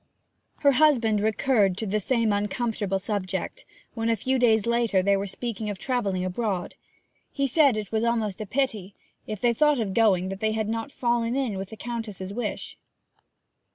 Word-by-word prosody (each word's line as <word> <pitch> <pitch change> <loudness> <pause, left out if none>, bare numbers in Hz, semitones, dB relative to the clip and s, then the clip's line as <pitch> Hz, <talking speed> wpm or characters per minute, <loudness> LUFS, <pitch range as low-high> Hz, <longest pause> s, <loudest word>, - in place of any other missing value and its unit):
Her 280 - +6
husband 250 -7 +3
recurred 215 -3 +2
to 220 - -2
the 210 +1 0
same 230 0 +1
uncomfortable 205 -1 -1
subject 200 - -3 0.3
when, 225 -1 -1
a 230 - +3
few 260 +3 0
days 225 -4 +4
later, 235 -5 +2
they 200 +1 +3
were 195 +1 -2
speaking 220 +1 -4
of 205 - -4
travelling 200 -7 -1
abroad. 185 -1 -2 0.6
He 275 - -1
said 275 -2 +4
that 215 - -1
it 205 - -12
was 220 0 0
almost 225 -4 0
a 215 - -5
pity, 215 -6 -2 0.3
if 215 -2 -4
they 240 +1 +2
thought 295 +2 +3
of 205 -4 -2
going, 190 -5 +3
that 195 0 -5
they 220 +1 0
had 220 -1 -1
not 225 +5 -3
fallen 235 -1 0
in 260 -7 -1
with 190 0 -5
the 220 - -10
Countess's 210 -5 -5
wish. 245 +3 -4
220 Hz, 185 wpm, -26 LUFS, 200-240 Hz, 0.6 s, Her